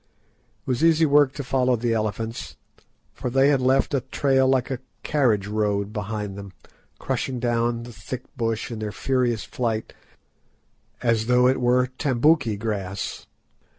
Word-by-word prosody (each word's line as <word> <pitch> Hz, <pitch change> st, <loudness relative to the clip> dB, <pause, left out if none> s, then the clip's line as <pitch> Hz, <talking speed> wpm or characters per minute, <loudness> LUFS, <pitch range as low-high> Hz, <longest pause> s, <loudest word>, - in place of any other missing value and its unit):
It -, -, -41 dB
was 130 Hz, +3 st, 0 dB
easy 165 Hz, -1 st, +5 dB
work 145 Hz, -2 st, +4 dB
to 140 Hz, -, -5 dB
follow 130 Hz, -1 st, +2 dB
the 120 Hz, 0 st, 0 dB
elephants, 110 Hz, +1 st, -3 dB, 0.6 s
for 125 Hz, -, -4 dB
they 135 Hz, +3 st, +4 dB
had 140 Hz, -3 st, +3 dB
left 130 Hz, +3 st, +2 dB
a 135 Hz, -, +2 dB
trail 135 Hz, 0 st, +1 dB
like 130 Hz, 0 st, +1 dB
a 130 Hz, -, -2 dB, 0.2 s
carriage 120 Hz, -9 st, +2 dB
road 105 Hz, -1 st, -1 dB
behind 105 Hz, -2 st, -4 dB
them, 100 Hz, -2 st, -9 dB, 0.4 s
crushing 130 Hz, -2 st, -2 dB
down 120 Hz, 0 st, 0 dB
the 120 Hz, 0 st, -10 dB
thick 120 Hz, +5 st, -7 dB
bush 115 Hz, -2 st, -2 dB
in 115 Hz, -, -5 dB
their 105 Hz, -1 st, -3 dB
furious 125 Hz, -1 st, 0 dB
flight 115 Hz, -3 st, -3 dB, 1.1 s
as 115 Hz, -2 st, +1 dB
though 125 Hz, 0 st, +5 dB
it 130 Hz, 0 st, +1 dB
were 125 Hz, +1 st, +3 dB
tambouki 135 Hz, -4 st, +2 dB
grass. 100 Hz, -3 st, -4 dB
120 Hz, 150 wpm, -24 LUFS, 110-130 Hz, 1.1 s, easy